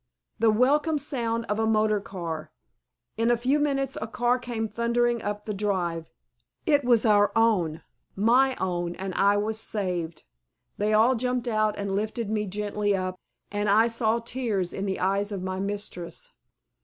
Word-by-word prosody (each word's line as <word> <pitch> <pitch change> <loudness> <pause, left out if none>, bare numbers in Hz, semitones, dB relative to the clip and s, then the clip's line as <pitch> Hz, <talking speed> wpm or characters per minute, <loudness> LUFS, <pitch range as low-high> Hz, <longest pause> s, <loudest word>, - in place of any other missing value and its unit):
The 225 0 +4
welcome 290 +8 +3
sound 235 -5 -2
of 210 0 -2
a 220 - +2
motor 215 -1 +2
car!!! 170 -7 -6 0.7
In 230 +1 +2
a 240 - +4
few 260 +5 +1
minutes 275 -2 0
a 220 - -3
car 240 +2 +1
came 235 -3 -3
thundering 235 +2 0
up 205 0 -4
the 210 - -3
drive. 180 -5 -1 0.6
It 290 -2 +3
was 240 -2 +3
our 205 -2 +4
own 195 -9 +2 0.3
my 250 +6 +4
own 175 -2 -2
and 190 0 -5
I 200 +2 +3
was 215 +1 -1
saved. 180 -7 -3 0.6
They 210 +1 +1
all 220 +4 +5
jumped 250 0 -1
out 215 -2 +1
and 200 -1 -2
lifted 215 +1 -2
me 210 -1 -1
tenderly 205 +1 -1
up 185 -1 -3 0.3
and 205 0 -1
I 220 +3 +5
saw 230 -1 +1
tears 230 -6 -2
in 195 +1 -3
the 190 - -2
eyes 200 +2 0
of 195 -3 -4
my 185 0 -3
mistress. 200 - -5
215 Hz, 165 wpm, -26 LUFS, 195-235 Hz, 0.7 s, all